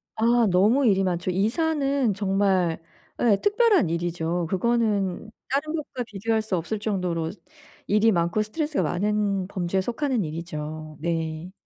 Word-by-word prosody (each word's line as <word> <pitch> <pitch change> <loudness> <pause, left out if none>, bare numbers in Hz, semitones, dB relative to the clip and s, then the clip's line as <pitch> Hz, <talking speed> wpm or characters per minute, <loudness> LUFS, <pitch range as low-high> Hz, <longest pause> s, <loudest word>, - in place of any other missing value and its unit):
아 230 0 +3
너무 215 +10 +4
일이 195 -3 +3
많죠. 175 0 -1
이사는 275 - +1
정말 190 -4 +1 0.4
예 215 -5 +4
특별한 415 - +3
일이죠. 170 0 -1
그거는 215 -1 0 0.2
다른 300 +4 -1
것과 275 -5 -4
비교할 220 +1 -1
수 215 -3 -2
없을 205 +6 -3
정도로 180 -6 -2 0.6
일이 210 +2 +4
많고 170 +3 +1
스트레스가 295 - -1
많은 200 +2 0
범주에 190 0 -1
속하는 245 0 -1
일이죠. 155 -1 -6
네. 165 +1 -3
200 Hz, 290 characters per minute, -25 LUFS, 175-235 Hz, 0.6 s, 너무